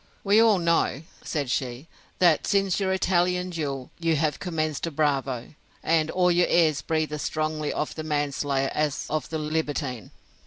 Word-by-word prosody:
We 205 +2 +4
all 225 -3 +5
know, 170 -4 +1 0.2
said 145 -6 -3
she, 130 +3 -3 0.3
that, 170 -4 +3
since 195 -2 +2
your 190 -1 0
Italian 180 -1 +1
duel, 140 -6 -4
you 165 -1 +1
have 150 -1 0
commenced 155 -3 -2
a - - -1
bravo; 140 -5 -1 0.3
and 160 -1 +2
all 180 0 +2
your 175 0 +3
airs 160 -4 +3
breathe 155 -1 -1
as 150 - -3
strongly 155 0 -2
of 150 - -2
the 160 - -5
manslayer 145 -2 -1
as 150 -2 -1
of 155 -1 -2
the 160 - -2
libertine. 150 - -3
155 Hz, 165 wpm, -26 LUFS, 145-175 Hz, 0.3 s, all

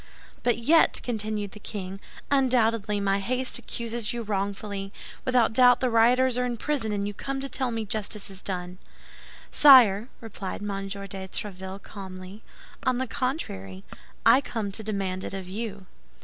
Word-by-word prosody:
But 240 -2 +2
yet," 305 +8 +5
continued 215 -3 -2
the 210 - -11
king, 195 -2 -6 0.3
"undoubtedly 230 -6 +2
my 200 0 +1
haste 255 +5 -1
accuses 235 -2 -3
you 240 -1 -4
wrongfully; 200 -1 -3 0.3
without 245 -3 +3
doubt 245 +1 +6
the 255 -2 0
rioters 245 +2 +4
are - - +1
in 240 -1 -2
prison, 270 -5 -1
and 200 -1 -1
you 205 - -4
come 270 +6 -4
to 275 - -2
tell 260 -1 -1
me 225 -2 -3
justice 210 -1 -1
is 190 0 -7
done." 180 -1 -4 0.7
"Sire," 240 -6 +7
replied 205 -3 -6
M. 195 -1 -3
de 200 0 -6 0.2
Tréville, 190 -1 -6
calmly, 190 0 -9 0.4
"on 255 -1 +1
the 260 - -1
contrary, 235 - -4 0.4
I 240 +4 +7
come 220 -6 -4
to 210 - -4
demand 195 -3 -3
it - - -5
of 190 -2 -6
you." 200 0 -5
215 Hz, 160 wpm, -26 LUFS, 195-245 Hz, 0.7 s, Sire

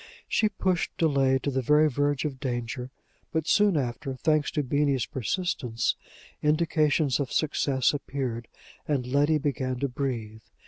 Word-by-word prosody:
She 215 - +2
pushed 185 -4 -1
delay 135 -4 +3
to 140 - 0
the 130 0 0
very 150 +5 +4
verge 145 +1 0
of 135 -3 -3
danger. 125 0 -3 0.4
But, 160 0 -1
soon 205 -5 +4
after, 130 0 -3
thanks 155 +2 +1
to 150 - -1
Beenie's 140 -2 +1
persistence, 125 - -1 0.5
indications 150 -3 +2
of 140 -3 -2
success 140 -4 +1
appeared, 130 -5 -4 0.4
and 140 -4 0
Letty 145 +4 +2
began 135 -3 -2
to 140 - +2
breathe. 120 -5 -4
140 Hz, 140 wpm, -27 LUFS, 130-150 Hz, 0.5 s, very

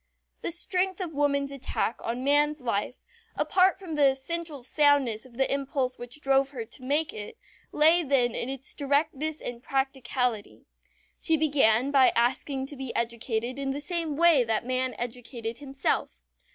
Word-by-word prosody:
The - - -2
strength 365 +2 0
of 350 -4 -4
woman's 280 -1 +1
attack 270 -3 -2
on 240 +3 -3
man's 295 +2 +3
life, 235 -1 -2 0.4
apart 375 0 +3
from 370 -4 -8
the 290 -2 +5
essential 290 +1 -4
soundness 270 -4 +2
of 240 -2 -18
the 265 0 +1
impulse 275 -2 -2
which 245 +5 -9
drove 270 0 +3
her 250 -5 -6
to 240 - -13
make 290 +4 +1
it, 210 -1 -8 0.3
lay 320 +3 +5
then 265 -6 +2
in 240 - -3
its 270 -1 -5
directness 295 +1 -1
and 240 -1 -7
practicality. 255 -4 -2 0.5
She 325 -1 +1
began 275 -5 +3
by 270 -2 +6
asking 265 +3 0
to 285 - -9
be 265 -2 -6
educated 235 +2 -2
in 275 -1 -2
the 275 +1 -2
same 330 -1 -2
way 325 -4 +5
that 225 0 -1
man 255 -1 -1
educated 235 -1 -5
himself. 270 - -2
270 Hz, 160 wpm, -27 LUFS, 245-295 Hz, 0.5 s, by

